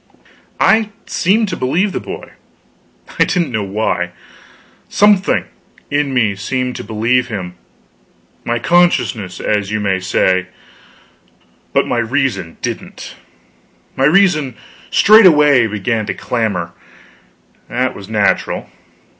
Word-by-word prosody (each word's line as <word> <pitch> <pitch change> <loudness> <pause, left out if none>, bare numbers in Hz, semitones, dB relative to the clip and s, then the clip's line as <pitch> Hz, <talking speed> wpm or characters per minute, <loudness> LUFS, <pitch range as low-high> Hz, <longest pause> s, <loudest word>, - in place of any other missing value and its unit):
I 220 -1 +3 0.2
seemed 210 +5 +1
to - - -3
believe 170 +11 0
the - - -3
boy, - - -8 0.9
I - - +7
didn't 175 -7 -1
know 110 -2 -1
why. 95 -3 -2 0.8
Something 205 -1 +3 0.5
in 145 -1 0
me 115 -6 +1
seemed 125 +5 -3
to - - -6
believe 115 +4 0
him 95 -6 -5 0.9
my 120 - -1
consciousness, 125 - +1
as 105 -2 -1
you 110 0 -1
may 95 -2 0
say; 95 0 +1 1.2
but - - +2
my 120 - -1
reason 115 - -1
didn't. - - -6 0.8
My 135 - +1
reason 155 - +3 0.3
straightway 150 - +6
began 110 +1 -2
to - - -3
clamor; 100 -8 -2 1.0
that 130 +1 -1
was 100 0 -11
natural. 105 -2 0
120 Hz, 115 wpm, -16 LUFS, 100-150 Hz, 1.2 s, I